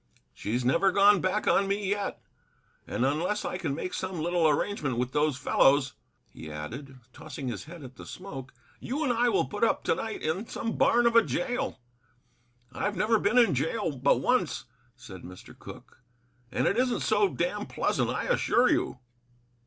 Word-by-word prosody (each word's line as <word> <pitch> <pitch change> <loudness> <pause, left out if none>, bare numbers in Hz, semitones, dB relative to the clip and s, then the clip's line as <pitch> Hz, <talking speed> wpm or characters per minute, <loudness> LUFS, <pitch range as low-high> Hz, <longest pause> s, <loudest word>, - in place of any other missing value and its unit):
She's 120 +4 -3
never 170 +9 +3
gone 200 0 +5
back 185 +3 0
on 195 - +3
me 200 0 -1
yet. 205 +1 -2 0.7
And 125 - -1
unless 170 +9 0
I 180 - -3
can 140 - -2
make 180 +4 -5
some 185 -2 -4
little 170 0 +2
arrangement 145 - -1
with 125 +1 -1
those 150 -1 +1
fellows," 135 +1 +3 0.3
he 80 - -10
added, 130 - -7 0.2
tossing 135 0 -7
his 120 - -6
head 165 -1 -11
at 130 0 -11
the - - -11
smoke, 140 -8 -8 0.3
"you 280 +6 -3
and 255 -5 +1
I 240 +1 +2
will - - +2
put 205 +1 -4
up 230 - +2
to - - +2
night 220 -1 -5
in 180 +8 -2
some 225 - -4
barn 240 0 +3
of 235 0 +3
a 230 - +9
jail. 245 - -2 0.9
I've 205 +9 -2
never 220 +1 +3
been 215 +5 +1
in 235 -8 +5
jail 160 - -1
but 135 +2 +3
once," 185 - 0 0.3
said 100 -8 -11
Mr. 90 +1 -12
Cooke, - - -13 0.5
"and - - 0
it 200 - +1
isn't 250 -1 +1
so 405 - +3
damned - - -2
pleasant, - - 0
I - - -2
assure 255 - +3
you." - - 0
180 Hz, 180 wpm, -28 LUFS, 135-220 Hz, 0.9 s, a